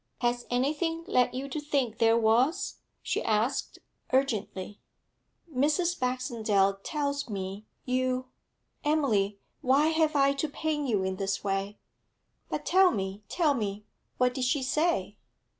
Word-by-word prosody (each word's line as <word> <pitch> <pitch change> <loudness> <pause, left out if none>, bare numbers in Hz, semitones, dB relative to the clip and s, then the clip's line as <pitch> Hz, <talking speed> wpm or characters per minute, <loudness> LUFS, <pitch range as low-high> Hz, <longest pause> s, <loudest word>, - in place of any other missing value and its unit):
'Has 240 0 0
anything 310 +7 0
led 250 -12 +2
you 265 +2 -3
to 305 - -3
think 275 -6 -1
there 225 0 +5
was?' 245 - +2 0.3
she - - -1
asked, 220 +5 0 0.3
urgently. 215 -7 -1 0.8
'Mrs. 320 +6 +2
Baxendale 225 -6 +1
tells 285 0 -2
me 195 +1 -5 0.2
you 255 0 0 0.6
Emily, 225 -10 +1 0.2
why 275 +5 +4
have 315 -1 +2
I 275 0 +4
to 280 +2 -2
pain 295 -1 -2
you 205 -6 +1
in 190 0 -2
this 195 0 -2
way?' 195 +1 -2 0.7
'But - - -3
tell 375 0 +6
me 195 - -3
tell 320 -5 +2
me 210 -4 -3 0.3
What 250 0 +2
did 255 0 -1
she 265 +2 +1
say?' 260 - 0
255 Hz, 135 wpm, -29 LUFS, 210-295 Hz, 0.8 s, tell